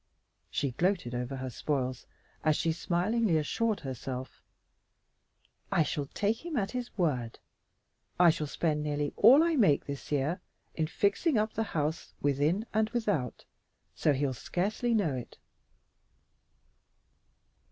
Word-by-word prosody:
She 140 - -1
gloated 175 -3 0
over 125 +2 -3
her 130 -1 -5
spoils 130 -1 -2 0.4
as 155 -1 +3
she 165 - +1
smilingly 180 +3 +1
assured 215 +8 0
herself, 130 -1 -6 1.3
"I 160 - +4
shall 145 -2 -2
take 210 - -1
him 335 -5 -3
at 195 -3 0
his 250 -2 -5
word. 130 - 0 0.8
I 175 -2 +8
shall 155 -1 -3
spend 150 0 0
nearly 145 -1 -1
all 260 +9 +7
I 335 -1 +2
make 195 - +4
this 140 +1 -7
year 150 +6 0 0.3
in 160 -1 -1
fixing 200 - +1
up 215 +1 +1
the 225 - -1
old 220 - -2
house 155 +1 -2
within 145 +9 +1
and 220 0 +2
without, 205 - -1 0.5
so 150 - +2
he'll 135 -1 0
scarcely 215 - -1
know 185 -10 +2
it." 125 -2 -7
160 Hz, 135 wpm, -30 LUFS, 140-215 Hz, 1.3 s, I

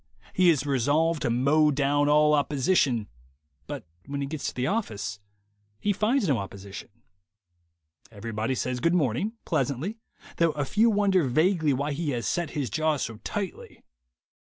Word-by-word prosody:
He 185 -1 +4
is 150 -4 +2
resolved 145 +4 +1
to - - 0
mow 140 +6 +3
down 145 0 +2
all 150 0 +5
opposition, 140 - +2 0.6
but - - -6 0.2
when 140 0 -4
he 140 - -1
gets 145 +1 -4
to - - -3
the 125 - -1
office 120 - -2 0.6
he 205 - +1
finds 215 +3 +1
no 135 -7 +2
opposition. 100 0 -8 1.2
Everybody 110 +3 -3
says 125 0 -2
Good 170 +6 +2
Morn 130 -10 +1
ing, 215 - -2
pleasantly, 160 - -1 0.4
though 165 -2 +3
a 145 -2 -2
few 220 +10 +3
wonder 200 -4 +3
vaguely 160 +4 +2
why 140 +3 -1
he 155 +1 -2
has 115 - -4
set 175 - -1
his 130 -7 -2
jaw 155 +4 +1
so 115 -4 -4
tightly. 195 - -6
145 Hz, 155 wpm, -27 LUFS, 125-170 Hz, 1.2 s, all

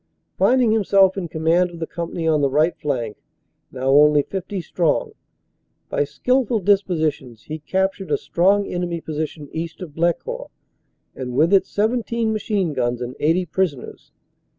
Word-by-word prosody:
Finding 250 -3 +3
himself 195 -3 +4
in 190 -3 -3
command 165 +3 +1
of 170 - -11
the 165 - -3
company 170 0 -4
on 155 -2 +3
the 140 - +2
right 155 +5 +2
flank, 120 -7 -3 0.5
now 130 +1 -1
only 150 +1 +6
50 190 +3 -5
strong, 170 -2 0 0.8
by 145 - 0
skilful 250 - 0
dispositions 160 - 0
he 155 +1 -6
captured 190 +4 -1
a - - +2
strong 200 +4 +2
enemy 175 -2 -3
position 155 -1 -5
east 165 +1 -5
of 175 -6 -8
Blecourt, 175 - -1 0.7
and 125 -2 -5
with 160 +7 +3
it 190 -1 +4
17 225 +1 0
machine 205 -6 -1
guns 120 -2 -1
and 125 +1 -5
80 165 +5 +2
prisoners. 160 -5 -3
170 Hz, 150 wpm, -21 LUFS, 150-195 Hz, 0.8 s, only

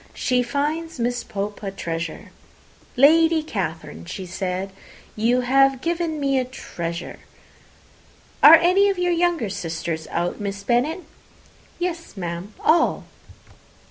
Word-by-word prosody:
She 250 -2 +1
finds 295 +5 -2
Miss 245 +1 -1
Pope 205 0 -5
a 200 - -3
treasure. 165 -4 -5 0.7
'Lady 320 +4 +5
Catherine,' 160 - -5
said 185 - -4 0.4
she, 215 - -8
'you 245 +3 +3
have 270 +1 +3
given 335 0 -2
me 275 -2 +1
a - - 0
treasure.' 170 -9 -6 1.2
Are 310 +3 +11
any 365 +5 +4
of 390 - -1
your 355 0 +1
younger 335 - 0
sisters 165 -3 -4
out, 175 +1 -2
Miss 200 0 -4
Bennet?" 255 - +1 0.8
"Yes, 340 - -4
ma'am, 175 +2 -5
all." 325 +1 +3
245 Hz, 120 wpm, -22 LUFS, -, 1.2 s, Are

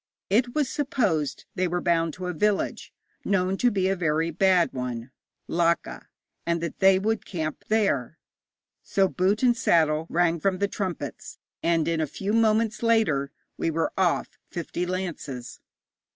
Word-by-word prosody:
It 240 +4 +2
was 300 -3 +2
supposed 215 - -1
they 185 -1 0
were 175 +1 -1
bound 165 -2 +1
to 185 - -6
a 180 - -2
village 205 +5 0 0.3
known 190 -1 +1
to 245 - +3
be 190 -4 0
a 195 - +1
very 165 -1 0
bad 185 +1 +3
one 125 -1 -4 0.4
Laka 170 - 0 0.4
and 170 0 0
that 170 0 -5
they 190 -1 +6
would 220 +3 -1
camp 155 -4 -4
there. 200 - +1 0.6
So 195 -1 +2
'boot 190 +5 0
and 245 -1 +5
saddle' 160 -6 +2
rang 170 -1 +2
from 190 +3 +1
the 200 +2 +1
trumpets, 190 -4 -5 0.2
and 165 -2 +1
in 165 -1 0
a 155 - 0
few 195 +8 -3
moments 220 -1 +2
later 210 -13 +2 0.3
we - - 0
were 165 0 -1
off, 185 -3 0
fifty 175 +1 -4
lances. 165 -9 -5
180 Hz, 155 wpm, -26 LUFS, 160-200 Hz, 0.6 s, they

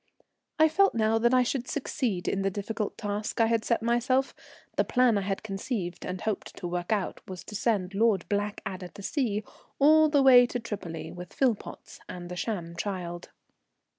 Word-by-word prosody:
I 315 0 +6
felt 395 +3 +3
now 225 0 +2
that 240 +1 +3
I 255 -1 +5
should 250 0 -2
succeed 250 -9 -2
in 195 - 0
the 195 - +1
difficult 205 +2 -4
task 210 0 -3
I 225 - +6
had 225 -1 +1
set 230 0 0
myself. 250 +3 +1 0.4
The - - +3
plan 250 -3 +3
I 200 - +1
had 195 0 -3
conceived 195 -4 -4
and 180 0 -4
hoped 215 -2 -3
to 175 - -4
work 175 +2 -3
out 205 -4 -1
was 185 -2 -7
to 210 - -9
send 200 -3 0
Lord 210 -2 +2
Blackadder 200 -3 -3
to 200 - -12
sea, 220 -5 -1 0.3
all 310 +2 +6
the 285 -2 +4
way 250 -2 +8
to 245 - -3
Tripoli, 195 -8 -6
with 180 0 -9
Philpotts 245 -6 -2
and 175 -1 -7
the 180 - -5
sham 175 -4 -3
child. 175 -2 -4
210 Hz, 185 wpm, -28 LUFS, 190-245 Hz, 0.4 s, way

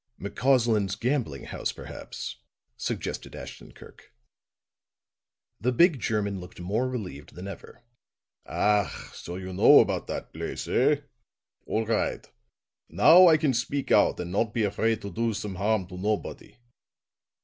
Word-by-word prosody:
"McCausland's 110 -3 +1
gambling 120 - -2
house, - - -3
perhaps," - - -8 0.4
suggested - - -4
Ashton - - -10
Kirk. - - -16 1.5
The 125 +4 +1
big 160 +3 +4
German 100 -4 -1
looked 90 0 -11
more 105 +9 -1
relieved 95 - -7
than 90 +3 -7
ever. 100 +4 -10 0.6
"Ach, 105 -1 0
so 85 - -8
you 95 0 -6
know 95 - +7
about - - +1
dot - - -6
place, - - -5
eh? 145 +3 +2 0.7
All 110 +1 0
ride. 110 0 -1 0.6
Now 165 - +7
I 160 -2 +6
can 150 -4 +1
speak 130 +4 -2
out - - +4
and 90 0 -4
not 105 +2 0
be 115 - +1
afraid 110 +2 0
to 100 - -5
do 115 +3 -1
some 105 -1 -4
harm 100 +1 0
to 90 - -9
nobody." 105 +4 -3
110 Hz, 140 wpm, -27 LUFS, 95-125 Hz, 1.5 s, know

